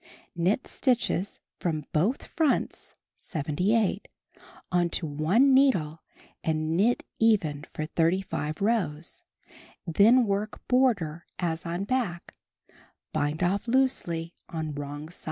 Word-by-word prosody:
Knit 180 +8 +1
stitches 240 -7 0 0.2
from 155 -4 -2
both 190 - +1
fronts 315 -4 -1 0.2
(78) 190 +7 0 0.6
on 175 -1 +2
to 170 - -2
one 170 - +3
needle 185 - +3 0.4
and 155 0 0
knit 220 +7 +2 0.2
even 165 -10 +2
for 155 - -4
35 165 -1 -1
rows, 185 -8 -1 0.6
then 220 +9 +5
work 205 +1 -3
border 200 -11 +1
as 170 -1 -2
on 175 +3 -2
back; 200 -7 -2 0.8
bind 150 +4 0
off 195 +6 0
loosely 175 -10 +1 0.2
on 160 -3 -4
wrong 145 +1 -6
side. 175 - -10
175 Hz, 110 wpm, -27 LUFS, 155-225 Hz, 0.8 s, then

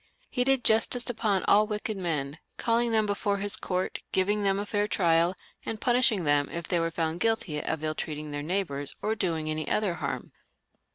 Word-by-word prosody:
He 250 - +1
did 270 -1 +2
justice 225 +3 +2
upon 210 -5 0
all 210 +1 +4
wicked 210 0 -3
men, 155 -5 -3 0.2
calling 235 0 +1
them 220 -1 +3
before 205 0 0
his 205 0 +4
court, 185 0 -2
giving 205 +3 +1
them 195 -1 +2
a 205 - -2
fair 205 0 0
trial, 170 -2 +3 0.3
and 220 - -4
punishing 240 -6 +3
them 145 -2 +2
if 170 0 -5
they 175 - +1
were 165 0 0
found 165 0 -2
guilty 190 -9 0
of 160 -1 -2
ill 155 0 0
treating 150 -1 -5
their 145 0 -3
neigh 185 +6 0
bours 140 -4 -6
or 215 - +1
doing 165 -7 -1
any 155 -1 -2
other 210 -4 +1
harm. 170 - -4
190 Hz, 195 wpm, -28 LUFS, 160-215 Hz, 0.3 s, all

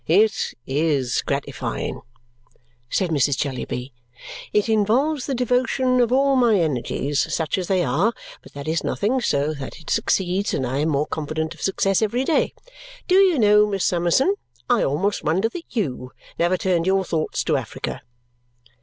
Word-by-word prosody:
"It 210 +6 +2
IS 140 -3 0
gratifying," 140 0 -3 0.9
said 185 +2 0
Mrs. 140 -2 +2
Jellyby. 130 -2 -4 0.6
"It 210 +1 +2
involves 245 +7 +1
the 275 - -1
devotion 255 +1 +1
of 240 -1 +2
all 275 +1 +3
my 235 -6 +4
energies, 145 -1 -1
such 160 -3 -1
as 180 - -4
they 185 -2 +2
are; 160 - +2 0.3
but - - -16
that 140 +1 -8
is 160 +1 0
nothing, 245 +6 0
so 145 -7 0
that 140 -3 -8
it 160 - -8
succeeds; 190 +2 0
and 130 - -1
I 130 +3 -2
am 155 +2 +1
more 145 0 +1
confident 155 +1 -3
of 160 - -16
success 195 0 +1
every 230 +4 0
day. 310 +3 +1 0.5
Do 365 - +1
you 375 -5 +4
know, 210 -2 +5
Miss 195 -2 -1
Summerson, 175 - +2 0.3
I 245 -3 +3
almost 190 +9 0
wonder 185 +8 +1
that 335 +7 -8
YOU 130 - -3 0.3
never 175 +2 +2
turned 180 -2 0
your 190 0 +2
thoughts 160 -2 -1
to - - +1
Africa." - - -4
185 Hz, 165 wpm, -22 LUFS, 150-225 Hz, 0.9 s, know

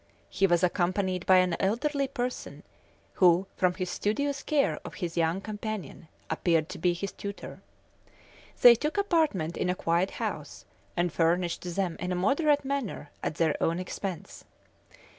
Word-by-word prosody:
He 195 - +3
was 175 0 +2
accompanied 185 +1 0
by 185 - +7
an 185 -2 +3
elderly 275 +8 0
person, 250 -1 -5 0.6
who, 180 +1 +6
from 180 -1 +1
his 185 -2 -3
studious 280 +6 -1
care 290 -2 +1
of - - -9
his 175 -3 -4
young 170 +2 +1
companion, 210 -6 -6 0.2
appeared 165 -3 +1
to - - -7
be 175 +1 +2
his 195 +3 -4
tutor. 200 0 -8 1.0
They 245 - +10
took 300 - -2
apartments 315 - +1
in - - 0
a 180 - +1
quiet 170 +2 +1
house, - - -5 0.3
and 175 -1 +1
furnished 175 +1 0
them 185 -4 -1
in 180 - -3
a - - 0
moderate 285 - +2
manner 265 - -3
at - - -3
their 160 -1 +1
own 165 +1 +1
expense. 185 0 -6
185 Hz, 155 wpm, -28 LUFS, 175-235 Hz, 1.0 s, They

